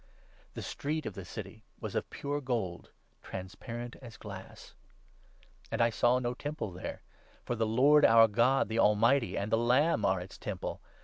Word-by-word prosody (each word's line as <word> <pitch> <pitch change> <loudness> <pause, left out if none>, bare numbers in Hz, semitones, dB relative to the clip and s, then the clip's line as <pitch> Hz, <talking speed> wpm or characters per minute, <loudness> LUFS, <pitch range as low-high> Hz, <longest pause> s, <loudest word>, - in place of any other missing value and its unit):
The - - -5
street 155 +1 -3
of 110 - -4
the 95 - -7
City 110 +3 -8 0.2
was - - -5
of - - -2
pure 145 +1 -3
gold, 115 -10 -3 0.3
transparent 115 +6 -7
as 120 -4 -12
glass. 100 -3 -10 1.0
And - - -2
I 115 0 +4
saw 120 +2 +3
no 120 -1 -1
Temple 145 -5 -4
22 90 +1 -10
there, - - -5 0.4
for - - -1
the 115 -1 0
Lord, 140 +7 +5
our 115 0 +8
God, 120 +5 +3
the 110 +2 -1
Almighty, 115 +5 +3
and 100 +2 -2
the 115 - +3
Lamb 125 +2 +3
are 95 -2 +2
its 90 +2 -10
Temple. - - -5
115 Hz, 175 wpm, -31 LUFS, 105-130 Hz, 1.0 s, our